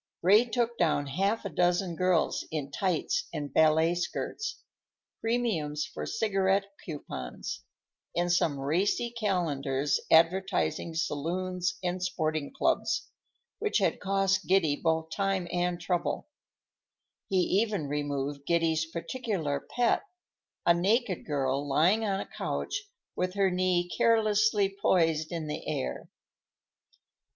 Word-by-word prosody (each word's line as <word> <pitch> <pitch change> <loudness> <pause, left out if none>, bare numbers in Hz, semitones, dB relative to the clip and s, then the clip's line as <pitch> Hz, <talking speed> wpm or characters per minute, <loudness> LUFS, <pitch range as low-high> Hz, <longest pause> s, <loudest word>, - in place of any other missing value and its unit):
Ray 205 +6 +6
took 235 -1 -1
down 155 -4 +2
half 195 +10 0
a - - -2
dozen 175 +1 +1
girls 180 -1 +1
in 145 -3 -4
tights 180 0 0
and 150 -3 -5
ballet 160 +2 +4
skirts,—premiums 195 - -3
for - - -6
cigarette 195 -3 +1 0.2
coupons,—and 175 +2 -6
some 160 -5 +2
racy 185 +11 0
calendars 150 - 0
advertising 165 0 +2
saloons 180 +4 -1
and 180 0 -1
sporting 155 -4 -1
clubs, 270 - 0 0.5
which 430 - +1
had - - +1
cost 195 0 +1
Giddy 180 -6 +3
both 160 0 -1
time 195 -2 0
and 175 0 0
trouble; 175 +1 -1 1.0
he 190 - +1 0.2
even 210 -8 -1
removed 145 -1 -3
Giddy's 165 -1 +2
particular 170 - -2
pet, 245 - +1 0.6
a 170 - +6
naked 195 +3 +1
girl 140 -1 0
lying 175 +10 +3
on 195 -2 0
a - - -4
couch 405 0 -3 0.3
with 185 +1 -1
her 195 -2 +3
knee 180 -1 +1
carelessly 215 0 +3
poised 160 -4 +2
in 165 -2 -3
the 150 - -5
air. 65 -1 -3
175 Hz, 115 wpm, -29 LUFS, 155-195 Hz, 1.0 s, Ray